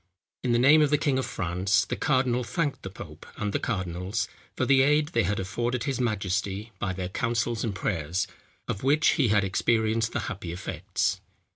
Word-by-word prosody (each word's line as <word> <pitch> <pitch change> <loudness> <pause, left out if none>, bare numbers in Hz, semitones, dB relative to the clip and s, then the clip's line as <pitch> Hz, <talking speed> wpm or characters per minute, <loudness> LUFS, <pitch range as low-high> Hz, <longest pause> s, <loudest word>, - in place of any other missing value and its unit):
In 125 - 0
the 120 - +4
name 140 +6 +6
of 150 - +4
the 150 - +4
king 140 -3 +1
of 130 - -2
France, 95 +3 +1
the - - -3
cardinal 130 -3 +1
thanked 145 +6 -2
the 95 - -6
pope 80 -6 -10
and 105 -1 -2
the - - +1
cardinals, 95 0 -2 0.3
for - - +1
the 135 -1 +5
aid 150 +2 +3
they 115 - +2
had 100 +1 0
afforded 120 +6 -2
his 135 -3 -1
majesty 100 -1 -1
by 95 - -1
their 90 -1 -4
counsels 115 +2 -1
and 110 -4 -2
prayers, 90 -3 -1 0.4
of 100 - -3
which 145 +3 +4
he 135 - +3
had 105 -1 +3
experienced 110 +3 +1
the 120 - -2
happy 95 -2 -5
effects. 90 +2 -2
110 Hz, 190 wpm, -27 LUFS, 95-130 Hz, 0.4 s, name